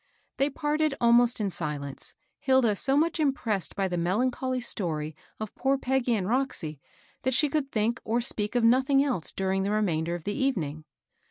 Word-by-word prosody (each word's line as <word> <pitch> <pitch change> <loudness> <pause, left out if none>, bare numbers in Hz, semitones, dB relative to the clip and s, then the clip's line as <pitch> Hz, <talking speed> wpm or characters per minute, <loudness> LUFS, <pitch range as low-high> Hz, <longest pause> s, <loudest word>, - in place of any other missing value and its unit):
They 275 +2 +2
parted 300 +1 0
almost 240 0 +4
in 200 -2 -1
silence, 145 -5 -4 0.2
Hilda 260 -5 +3
so 270 +7 +2
much 330 +2 +1
im 295 -3 +3
pressed 205 - -2
by 195 -1 0
the 175 -2 -2
melancholy 250 +8 0
story 160 -10 -3 0.2
of 215 -1 -5
poor 275 +1 +1
Peggy 255 -2 +1
and 190 -4 -2
Roxy 215 - -1 0.4
that 260 -1 +1
she 295 +2 +3
could 280 -1 -1
think 230 +3 0
or 230 +2 0
speak 220 -3 0
of 240 - +2
nothing 265 +4 +4
else 250 - -2
during 190 0 -1
the 195 - -1
remainder 175 -6 0
of 175 - -7
tl^ 205 - -2
evening. 165 - -1
230 Hz, 180 wpm, -27 LUFS, 185-265 Hz, 0.4 s, almost